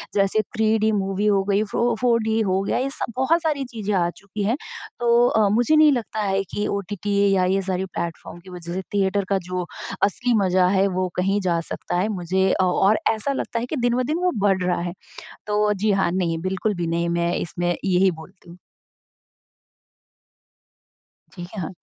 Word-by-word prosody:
जैसे 200 Hz, +2 st, +3 dB, 0.2 s
3डी 220 Hz, 0 st, +2 dB
मूवी 195 Hz, 0 st, -1 dB
हो 200 Hz, -2 st, +3 dB
गई 200 Hz, +1 st, +3 dB
फ़ो 235 Hz, 0 st, +1 dB
4डी 230 Hz, -2 st, +2 dB
हो 190 Hz, 0 st, +1 dB
गया -, -, -1 dB
ये 265 Hz, +2 st, -1 dB
सब 275 Hz, -, -3 dB
बहुत 265 Hz, +7 st, +2 dB
सारी 300 Hz, -4 st, -1 dB
चीज़ें 220 Hz, -5 st, -4 dB
आ 175 Hz, -2 st, +2 dB
चुकी 205 Hz, +1 st, -6 dB
हैं। 225 Hz, +6 st, +1 dB, 0.4 s
तो 240 Hz, 0 st, +4 dB
अ, 220 Hz, -3 st, +3 dB
मुझे 240 Hz, +9 st, +3 dB
नहीं 305 Hz, -1 st, +6 dB
लगता 230 Hz, -4 st, -2 dB
है 195 Hz, -1 st, 0 dB
कि 205 Hz, -, -1 dB
ओटीटी 200 Hz, 0 st, -3 dB, 0.2 s
या 185 Hz, -1 st, +3 dB
ये 190 Hz, +2 st, +1 dB
सारे 190 Hz, 0 st, -2 dB
प्लेटफ़ॉर्म 170 Hz, -2 st, -6 dB
की 180 Hz, +2 st, -15 dB
वजह 175 Hz, -1 st, -7 dB
से 190 Hz, -, -2 dB
थिएटर 200 Hz, 0 st, +1 dB
का 195 Hz, -, +2 dB
जो 180 Hz, -1 st, -2 dB, 0.4 s
असली 240 Hz, +5 st, +1 dB
मज़ा 185 Hz, -1 st, +3 dB
है, 195 Hz, +1 st, +3 dB
वो 185 Hz, -1 st, -1 dB
कहीं 195 Hz, +3 st, +1 dB
जा 175 Hz, -3 st, +1 dB
सकता -, -, -3 dB
है। 190 Hz, -, +1 dB
मुझे 190 Hz, -1 st, 0 dB
अ -, -, +3 dB
और 205 Hz, +3 st, +3 dB
ऐसा 225 Hz, +6 st, 0 dB
लगता 240 Hz, -3 st, -3 dB
है 235 Hz, -, -3 dB
कि 280 Hz, -, -4 dB
दिन-ब-दिन 250 Hz, +5 st, 0 dB
वो 360 Hz, 0 st, +1 dB
बढ़ 195 Hz, -2 st, +2 dB
रहा 180 Hz, -1 st, 0 dB
है। 175 Hz, 0 st, -4 dB, 0.5 s
तो 210 Hz, 0 st, +2 dB
जी 205 Hz, +2 st, 0 dB
हाँ, 195 Hz, -3 st, +1 dB
नहीं 175 Hz, -2 st, 0 dB
बिल्कुल 190 Hz, +4 st, -1 dB
भी 175 Hz, -1 st, -2 dB
नहीं 170 Hz, +1 st, 0 dB
मैं 170 Hz, 0 st, 0 dB
इसमें 175 Hz, 0 st, -1 dB
यही 190 Hz, 0 st, +3 dB
बोलती 175 Hz, +2 st, -13 dB
हूँ। 170 Hz, -, -12 dB, 2.8 s
जी, 175 Hz, -, -8 dB
ह -, -, -2 dB
हाँ। 165 Hz, +2 st, -5 dB
195 Hz, 190 wpm, -23 LUFS, 185-220 Hz, 2.8 s, नहीं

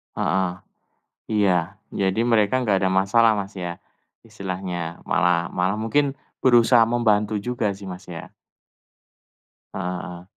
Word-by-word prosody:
Heeh, 95 Hz, -2 st, 0 dB, 0.8 s
iya. 95 Hz, -3 st, +2 dB, 0.2 s
Jadi 95 Hz, +3 st, 0 dB
mereka 115 Hz, -2 st, +2 dB
enggak 105 Hz, -5 st, +2 dB
ada -, -, +3 dB
masalah, 100 Hz, +4 st, +4 dB
Mas, 100 Hz, 0 st, -5 dB
ya, 85 Hz, -1 st, -5 dB, 0.4 s
istilahnya 95 Hz, -5 st, -5 dB
malah 90 Hz, -2 st, +1 dB
malah 90 Hz, +2 st, 0 dB
mungkin 135 Hz, +5 st, +1 dB, 0.2 s
berusaha 120 Hz, -1 st, +5 dB
membantu 110 Hz, -3 st, +1 dB
juga 115 Hz, -3 st, -1 dB
sih, 100 Hz, 0 st, -11 dB
Masnya? 90 Hz, -2 st, -9 dB, 1.4 s
Heeh 90 Hz, -1 st, -3 dB
heeh. 90 Hz, 0 st, -9 dB
95 Hz, 115 wpm, -23 LUFS, 90-115 Hz, 1.4 s, berusaha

